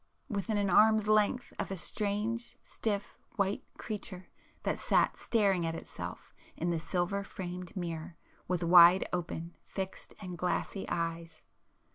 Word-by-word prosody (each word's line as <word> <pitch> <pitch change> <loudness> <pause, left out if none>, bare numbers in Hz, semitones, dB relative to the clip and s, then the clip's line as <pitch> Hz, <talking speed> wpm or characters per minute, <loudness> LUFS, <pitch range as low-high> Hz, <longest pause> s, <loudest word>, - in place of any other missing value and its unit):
within 205 -1 -1
an 205 -1 +1
arm's 215 +3 +5
length 215 +4 +2
of - - -2
a 195 - -3
strange, 210 +5 -1
stiff 205 -2 -3 0.2
white 200 0 0
creature 195 -4 -6 0.3
that - - -1
sat - - +3
staring 200 -6 +2
at 165 0 -1
itself - - -8 0.2
in 170 +2 0
the 170 - 0
silver 180 +4 -1
framed 180 -1 -7
mirror 170 -1 -4 0.3
with 180 -1 0
wide 175 +2 +8
open, 170 -1 -3
fixed 190 -1 -6
and 180 -4 -7
glassy 180 +2 -1
eyes! 165 -1 -3
185 Hz, 135 wpm, -32 LUFS, 170-205 Hz, 0.3 s, wide